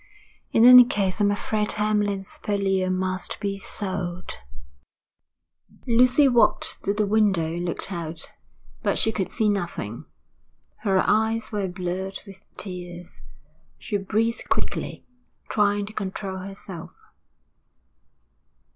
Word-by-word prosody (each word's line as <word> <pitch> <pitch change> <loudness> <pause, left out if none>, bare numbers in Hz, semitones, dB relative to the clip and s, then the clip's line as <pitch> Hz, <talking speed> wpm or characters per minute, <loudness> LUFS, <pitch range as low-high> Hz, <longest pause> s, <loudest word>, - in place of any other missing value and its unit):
In 225 - +4
any 250 0 +11
case, 205 -4 -1
I'm 205 - +4
afraid 210 +1 0
Hamlyn's 205 -2 -1
Purlieu 195 -2 0
must 185 0 -2
be 200 -1 -3
sold.' 185 -3 -4 1.5
Lucy 250 +3 +5
walked 240 -3 +2
to 200 - +2
the 210 0 +1
window 200 -5 +2
and 170 +2 -3
looked 175 +3 -2
out. 170 -2 -4 0.5
But - - +1
she 220 - +3
could 195 -4 -2
see 220 -2 0
nothing. 175 - -2 0.7
Her 195 -3 +2
eyes 220 +1 +1
were 205 -3 -1
blurred 185 +1 -4
with 195 -2 -12 0.2
tears. 175 -2 -6 0.6
She 205 - -2
breathed 220 +4 -1
quickly, - - -2 0.4
trying 205 -1 +2
to 215 - -10
control 195 -1 -4
herself. 190 -2 -8
200 Hz, 115 wpm, -24 LUFS, 185-215 Hz, 1.5 s, any